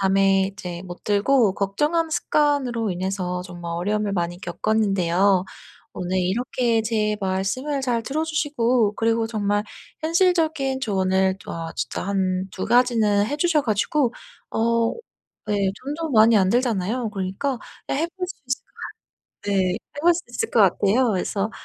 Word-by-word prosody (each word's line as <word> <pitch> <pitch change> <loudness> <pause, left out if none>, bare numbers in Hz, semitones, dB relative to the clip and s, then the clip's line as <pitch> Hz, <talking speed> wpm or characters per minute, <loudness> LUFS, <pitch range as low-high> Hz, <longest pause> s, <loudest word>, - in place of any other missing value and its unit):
밤에 195 0 +3
이제 180 -3 -7
못 175 -1 -10
들고 210 +1 +3
걱정하는 295 - 0
습관으로 270 -9 +1
인해서 180 0 -2
정말 175 -2 -7
어려움을 205 +4 -1
많이 175 -2 -2
겪었는데요. 195 -1 +1 0.5
오늘 180 +1 -1
이렇게 230 +4 0
제 215 -1 0
말씀을 200 +10 -1
잘 245 -3 0
들어 285 +7 -2
주시고 255 -8 +1
그리고 225 0 +1
정말 205 -2 0 0.4
현실적인 320 -5 +2
조언을 190 -4 +1
또 - - -8
아 165 -1 -5
진짜 120 0 -3
1-2 190 -1 -1
가지는 225 -4 +3
해 285 +7 -2
주셔 315 -2 +2
가지고 235 +4 +1 0.4
어 230 0 +1 0.6
예 210 - +1 0.3
돈도 315 +3 -3
많이 225 -2 +6
안 190 -2 +4
들잖아요. 235 -1 0
그러니까 200 +7 -2 0.3
예 - - +1
해 310 +5 0
볼 365 -1 -2
수 - - -8
있을 255 0 -3
것 - - -35 0.5
같 205 - -9
네. 190 -2 +2
해 290 - -8
볼 345 +1 +6
수 345 - -4
있을 450 - -3
것 230 - +3
같아요. 205 +5 +3
그래서 195 +2 -1
215 Hz, 295 characters per minute, -23 LUFS, 190-255 Hz, 0.6 s, 많이